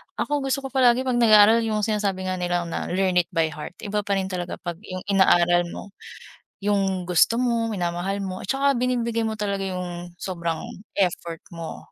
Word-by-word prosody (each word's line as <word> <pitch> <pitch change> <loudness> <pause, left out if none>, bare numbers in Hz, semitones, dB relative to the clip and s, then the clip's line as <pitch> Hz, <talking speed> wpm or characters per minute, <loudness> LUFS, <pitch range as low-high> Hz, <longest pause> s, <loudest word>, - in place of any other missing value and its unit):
ako 290 -2 -1
gusto 270 +1 -1
ko - - -3
palagi 255 -1 +4
'pag 250 -2 0
nag-aaral 220 0 +7
yung 215 -1 -1
sinasabi 200 -3 -1
nga 185 - -3
nilang 175 -1 -1
na - - -3
learn 185 0 +2
it 170 - 0
by 160 -1 +2
heart, 155 +4 -8
iba 210 0 -1
pa 200 - +2
rin 190 0 -2
talaga 175 -1 -4
pag 175 -1 -6
yung 185 0 -6
inaaral 175 -2 +4
mo, 195 +3 -9 0.7
yung 195 -3 +1
gusto 180 +6 +3
mo, 235 -2 +1
minamahal 190 0 -2
mo, 185 -1 -5
at - - -8
'tsaka 275 +3 +2
binibigay 235 -2 0
mo 220 - -3
talaga 200 -2 -2
yung 175 -1 -6
sobrang 170 -3 -4 0.3
effort 170 -3 -1
mo 165 -1 -8
195 Hz, 185 wpm, -24 LUFS, 175-220 Hz, 0.7 s, nag-aaral